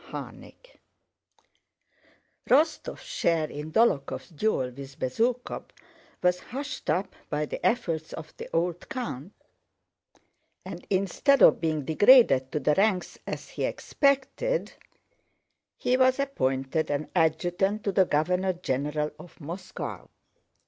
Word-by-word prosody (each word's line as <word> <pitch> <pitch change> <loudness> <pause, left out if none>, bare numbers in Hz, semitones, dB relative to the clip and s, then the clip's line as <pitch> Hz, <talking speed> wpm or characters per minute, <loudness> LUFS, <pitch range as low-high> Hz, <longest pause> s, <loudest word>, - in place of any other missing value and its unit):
CHAPTER - - -7
X - - -19 1.8
Rostóv's 310 +5 +2
share 165 -2 0
in 150 +2 -6
Dólokhov's 190 -9 +1
duel 160 -7 -1
with 135 +1 -10
Bezúkhov 230 - -1 0.6
was 180 0 +3
hushed 270 +4 -6
up 180 +6 0
by 150 0 -1
the - - -7
efforts 165 -10 0
of 155 -1 -9
the - - -8
old 170 +1 -1
count, 200 - -5 1.3
and - - -8
instead 200 +9 +3
of - - +6
being 155 -4 -1
degraded 160 - +6
to 150 - -1
the 150 +2 +2
ranks 195 0 +1
as - - -5
he - - -5
expected 280 - 0 1.0
he 250 - +1
was 260 0 +4
appointed 135 - -1
an 145 +1 -1
adjutant 175 +5 +1
to 200 - 0
the 190 0 +4
governor 180 +5 +1
general 150 -2 -2
of 175 - -14
Moscow. 170 +5 -7
175 Hz, 120 wpm, -27 LUFS, 150-230 Hz, 1.8 s, of